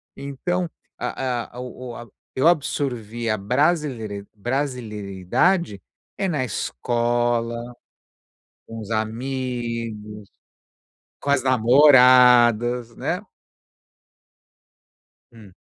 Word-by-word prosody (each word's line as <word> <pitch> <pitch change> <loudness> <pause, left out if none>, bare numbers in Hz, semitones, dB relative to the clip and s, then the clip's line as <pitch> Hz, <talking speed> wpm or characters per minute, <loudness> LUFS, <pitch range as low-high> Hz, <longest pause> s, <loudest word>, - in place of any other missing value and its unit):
Então, 170 +6 -3 0.3
a 125 -2 -4
a - - -6
o 125 0 -8
o - - -9
a 120 - -9 0.3
eu 130 +5 +3
absorvi 120 -8 -1
a 110 - +1
brasileiri 115 - -1
brasilidade, 115 - -1 0.4
eh, 195 - 0
na 145 -8 -1
escola, 120 -1 -1 1.1
com 115 - -8
os 110 -1 -8
amigos, 115 -2 -4 0.9
com 140 - -2
as 140 -3 +3
namoradas, 125 -2 +5
né. - - -2 2.1
Hum. 105 -5 -15
120 Hz, 85 wpm, -22 LUFS, 110-135 Hz, 2.1 s, namoradas